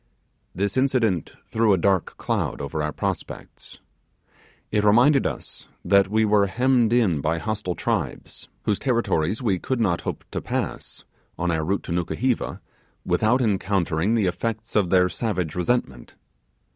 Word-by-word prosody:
This 100 Hz, +4 st, -1 dB
incident 120 Hz, -, +1 dB
threw 110 Hz, -2 st, +2 dB
a -, -, +3 dB
dark 95 Hz, 0 st, +1 dB
cloud -, -, -2 dB
over 70 Hz, +2 st, -3 dB
our 75 Hz, 0 st, -1 dB
prospects. -, -, -5 dB, 0.9 s
It 105 Hz, -1 st, +1 dB
reminded 125 Hz, +7 st, +5 dB
us -, -, -7 dB, 0.2 s
that 100 Hz, -1 st, +4 dB
we 110 Hz, +2 st, +2 dB
were 105 Hz, -1 st, +3 dB
hemmed 125 Hz, +1 st, +2 dB
in 105 Hz, -, +2 dB
by 80 Hz, +2 st, 0 dB
hostile 105 Hz, -1 st, -3 dB
tribes, -, -, -3 dB
whose 105 Hz, -, 0 dB
territories 115 Hz, -, 0 dB
we 95 Hz, -6 st, +1 dB
could 130 Hz, +5 st, -2 dB
not 95 Hz, -7 st, +1 dB
hope -, -, -5 dB
to -, -, -3 dB
pass, -, -, -4 dB, 0.3 s
on 90 Hz, 0 st, 0 dB
our 80 Hz, -1 st, 0 dB
route 95 Hz, +5 st, -1 dB
to -, -, -7 dB
Nukuheva, 110 Hz, +9 st, -1 dB, 0.4 s
without 125 Hz, +4 st, +2 dB
encountering 100 Hz, -2 st, +1 dB
the 110 Hz, -4 st, +2 dB
effects 110 Hz, +5 st, -3 dB
of 100 Hz, -5 st, +2 dB
their 90 Hz, -1 st, +4 dB
savage 90 Hz, -7 st, -2 dB
resentment. 90 Hz, -, -2 dB
100 Hz, 145 wpm, -24 LUFS, 90-115 Hz, 0.9 s, reminded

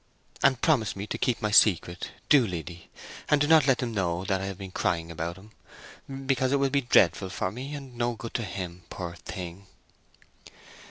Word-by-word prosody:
And 135 Hz, -3 st, +4 dB
promise 130 Hz, -11 st, +2 dB
me 100 Hz, +1 st, -5 dB
to -, -, -4 dB
keep 125 Hz, -4 st, 0 dB
my 105 Hz, -, +1 dB
secret—do, 105 Hz, -, +3 dB
Liddy! 85 Hz, -1 st, -7 dB, 0.4 s
And 150 Hz, -, +4 dB
do 145 Hz, -, +3 dB
not 155 Hz, -2 st, +5 dB
let 135 Hz, -2 st, +4 dB
them 120 Hz, -3 st, -3 dB
know 90 Hz, -3 st, -1 dB
that 95 Hz, 0 st, 0 dB
I -, -, -3 dB
have 95 Hz, -2 st, -5 dB
been 95 Hz, -1 st, -8 dB
crying 85 Hz, -2 st, -1 dB
about 85 Hz, +1 st, -4 dB
him, 105 Hz, +3 st, -15 dB, 0.7 s
because 130 Hz, -1 st, +1 dB
it -, -, +4 dB
will 135 Hz, -1 st, +1 dB
be 140 Hz, 0 st, +2 dB
dreadful 95 Hz, -, +3 dB
for 95 Hz, -1 st, -2 dB
me, 135 Hz, +7 st, -6 dB
and 135 Hz, -3 st, -9 dB
no 120 Hz, 0 st, -1 dB
good 115 Hz, +1 st, -8 dB
to 115 Hz, -, -1 dB
him, 90 Hz, -3 st, -6 dB
poor 85 Hz, -2 st, -5 dB
thing!" 90 Hz, +2 st, -8 dB
100 Hz, 195 wpm, -27 LUFS, 90-130 Hz, 0.7 s, not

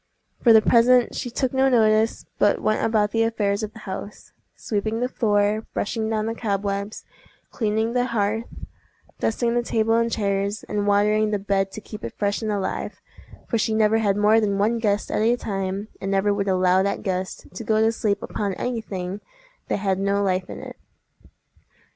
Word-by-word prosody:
For 235 Hz, -, +6 dB
the 220 Hz, -1 st, +7 dB
present 245 Hz, 0 st, +4 dB
she 245 Hz, -, -4 dB
took 255 Hz, +2 st, -1 dB
no 265 Hz, 0 st, +3 dB
notice, 220 Hz, -2 st, +2 dB
but 205 Hz, -, +3 dB
went 215 Hz, -, 0 dB
about 215 Hz, -2 st, +2 dB
the 225 Hz, -, +1 dB
affairs 215 Hz, -3 st, 0 dB
of 215 Hz, -1 st, -5 dB
the -, -, -13 dB
house, 200 Hz, +1 st, -7 dB, 0.2 s
sweeping 215 Hz, +1 st, -2 dB
the 250 Hz, -, 0 dB
floor, 210 Hz, -3 st, +1 dB
brushing 220 Hz, +1 st, -2 dB
down 215 Hz, -1 st, -1 dB
the 225 Hz, -, -2 dB
cobwebs, 200 Hz, -1 st, -3 dB, 0.5 s
cleaning 220 Hz, 0 st, 0 dB
the 245 Hz, 0 st, +2 dB
hearth, 225 Hz, -1 st, -1 dB, 0.7 s
dusting 235 Hz, +1 st, 0 dB
the 240 Hz, -, +2 dB
table 225 Hz, -1 st, +1 dB
and 230 Hz, 0 st, +2 dB
chairs, 200 Hz, -1 st, -1 dB
and 205 Hz, -1 st, -2 dB
watering 210 Hz, +1 st, +3 dB
the 210 Hz, -, 0 dB
bed 195 Hz, -1 st, 0 dB
to 215 Hz, -, -7 dB
keep 210 Hz, +1 st, -10 dB
it -, -, -7 dB
fresh 200 Hz, +1 st, 0 dB
and 215 Hz, -1 st, -2 dB
alive—for 205 Hz, +3 st, -5 dB
she 220 Hz, 0 st, 0 dB
never 220 Hz, 0 st, +3 dB
had 205 Hz, -2 st, +1 dB
more 215 Hz, +2 st, +4 dB
than 200 Hz, -2 st, 0 dB
one 220 Hz, +4 st, +1 dB
guest 210 Hz, -2 st, 0 dB
at -, -, 0 dB
a 230 Hz, +2 st, +3 dB
time, 195 Hz, -2 st, -3 dB
and 195 Hz, -, -3 dB
never 195 Hz, +1 st, +2 dB
would 200 Hz, 0 st, -2 dB
allow 185 Hz, 0 st, +3 dB
that 200 Hz, +1 st, -1 dB
guest 185 Hz, -2 st, -3 dB
to 190 Hz, -, -6 dB
go 215 Hz, 0 st, +1 dB
to 220 Hz, +1 st, +4 dB
sleep 210 Hz, -3 st, -1 dB
upon 200 Hz, -3 st, -3 dB
any 245 Hz, +1 st, -2 dB
thing 190 Hz, -1 st, -5 dB, 0.5 s
that -, -, 0 dB
had 195 Hz, -2 st, 0 dB
no 200 Hz, +1 st, +1 dB
life 185 Hz, -1 st, 0 dB
in -, -, -7 dB
it. -, -, -9 dB
210 Hz, 190 wpm, -23 LUFS, 200-225 Hz, 0.7 s, the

